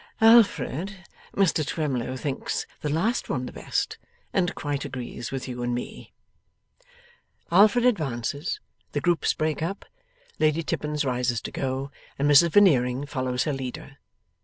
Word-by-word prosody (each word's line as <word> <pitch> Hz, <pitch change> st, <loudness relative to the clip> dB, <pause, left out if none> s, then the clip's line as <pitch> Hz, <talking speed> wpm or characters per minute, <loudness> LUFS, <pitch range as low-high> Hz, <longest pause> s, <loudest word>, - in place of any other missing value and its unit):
Alfred, 205 Hz, -, +4 dB, 0.3 s
Mr 185 Hz, -5 st, +2 dB
Twemlow 130 Hz, -4 st, -2 dB
thinks 135 Hz, +1 st, -3 dB
the 150 Hz, -, -3 dB
last 180 Hz, +11 st, 0 dB
one 130 Hz, -2 st, -1 dB
the -, -, -7 dB
best, -, -, -3 dB, 0.3 s
and 180 Hz, -1 st, +1 dB
quite 145 Hz, -2 st, -3 dB
agrees 125 Hz, -4 st, -6 dB
with 135 Hz, -1 st, -4 dB
you 125 Hz, -1 st, -5 dB
and 120 Hz, 0 st, -1 dB
me.' 120 Hz, -, -7 dB, 1.4 s
Alfred 210 Hz, +6 st, +5 dB
advances. 145 Hz, -, -1 dB, 0.3 s
The 145 Hz, -, 0 dB
groups 175 Hz, +1 st, +1 dB
break 155 Hz, 0 st, -1 dB
up. 195 Hz, +5 st, -3 dB, 0.5 s
Lady 155 Hz, +1 st, +2 dB
Tippins 150 Hz, -1 st, -2 dB
rises 125 Hz, -2 st, 0 dB
to -, -, -6 dB
go, 135 Hz, +1 st, -3 dB, 0.3 s
and 140 Hz, -, +1 dB
Mrs 145 Hz, +4 st, +7 dB
Veneering 140 Hz, -9 st, +4 dB
follows 130 Hz, -3 st, -1 dB
her 150 Hz, -, -1 dB
leader. 130 Hz, -2 st, -6 dB
145 Hz, 135 wpm, -26 LUFS, 130-170 Hz, 1.4 s, Mrs